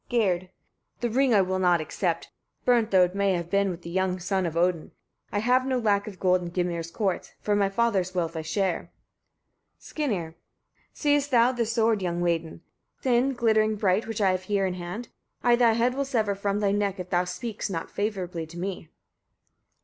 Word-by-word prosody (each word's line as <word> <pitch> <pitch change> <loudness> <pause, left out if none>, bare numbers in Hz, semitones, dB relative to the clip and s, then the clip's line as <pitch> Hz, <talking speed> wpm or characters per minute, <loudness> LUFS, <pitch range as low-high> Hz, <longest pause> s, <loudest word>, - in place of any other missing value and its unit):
Gerd. 185 -7 +1 0.5
22. 240 - +1
The - - -4
ring 265 -2 +4
I 200 - +6
will 185 0 -1
not 180 -2 +3
accept, 165 +2 -2 0.3
burnt 235 -3 +3
though 190 -3 +5
it 180 0 0
may 200 -1 +2
have 170 -1 -3
been 200 0 +2
with 175 -1 -6
the 170 - -7
young 190 0 0
son 185 0 -1
of 165 0 -4
Odin. 170 -2 0 0.4
I - - -1
have 250 +4 +3
no 260 -1 0
lack 205 -4 +1
of 200 -3 -8
gold 185 -1 +3
in 175 -1 -6
Gymir's 170 -2 -2
courts; 190 0 -2
for 210 - 0
my 200 -1 +2
father's 195 -4 0
wealth 165 -2 -1
I 160 - -2
share. 180 +2 -1 0.9
Skirnir. 200 - -3
23. 165 - -39 0.5
Seest 290 -1 +1
thou 245 -1 +5
this 235 -3 -1
sword, 225 -3 +2
young 175 -1 -1
maiden! 165 -2 -1 0.4
thin, 255 +1 +2
glittering 220 -2 +2
bright, 200 +1 +1
which 225 -1 -3
I 195 -2 +4
have 185 0 -2
here 200 -1 +1
in 185 - -1
hand? 180 +6 -6 0.3
I 240 -1 +5
thy 235 -2 +4
head 235 +2 +2
will 280 +2 -1
sever 225 -7 0
from 200 +1 -1
thy 200 -1 +2
neck, 200 -1 0
if 180 0 -7
thou 175 0 +3
speakst 205 +5 -4
not 165 -4 -4
favourably 185 -6 -3
to 170 +2 -11
me. 180 -3 -5
195 Hz, 205 wpm, -26 LUFS, 180-225 Hz, 0.9 s, I